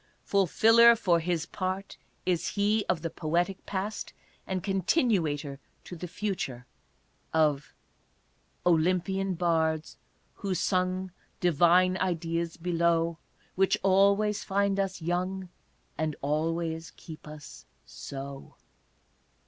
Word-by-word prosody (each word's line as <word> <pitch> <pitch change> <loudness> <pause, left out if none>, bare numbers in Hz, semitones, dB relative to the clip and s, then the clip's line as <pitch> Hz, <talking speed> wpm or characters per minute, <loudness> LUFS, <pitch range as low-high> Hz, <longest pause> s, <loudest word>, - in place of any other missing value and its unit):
Fulfiller 225 +5 +5
for 175 -6 +2
his 165 -1 -1
part 190 +2 -4 0.3
is 180 -3 0
he 210 +1 +2
of 165 -2 0
the 165 - -2
poetic 175 +4 -1
past 200 +2 -4 0.3
and 185 -2 -2
continuator 180 - 0 0.2
to 180 - -9
the 180 +1 -6
future 175 -10 -4 0.7
of 150 -3 +1 0.4
" - - -40
Olympian 185 +3 +2
bards 160 -2 0 0.4
who 195 -2 -2
sung 185 0 0 0.3
Divine 180 +2 +4
ideas 165 -2 -2
below, 170 -1 +1 0.3
Which 195 0 +2
always 200 +2 +3
find 200 0 +1
us 190 -3 -2
young, 185 +2 -2 0.5
And 155 -2 -1
always 165 +3 -1
keep 160 -3 -11
us 150 -1 -11 0.2
so." 140 0 -8
175 Hz, 105 wpm, -28 LUFS, 160-195 Hz, 0.7 s, Fulfiller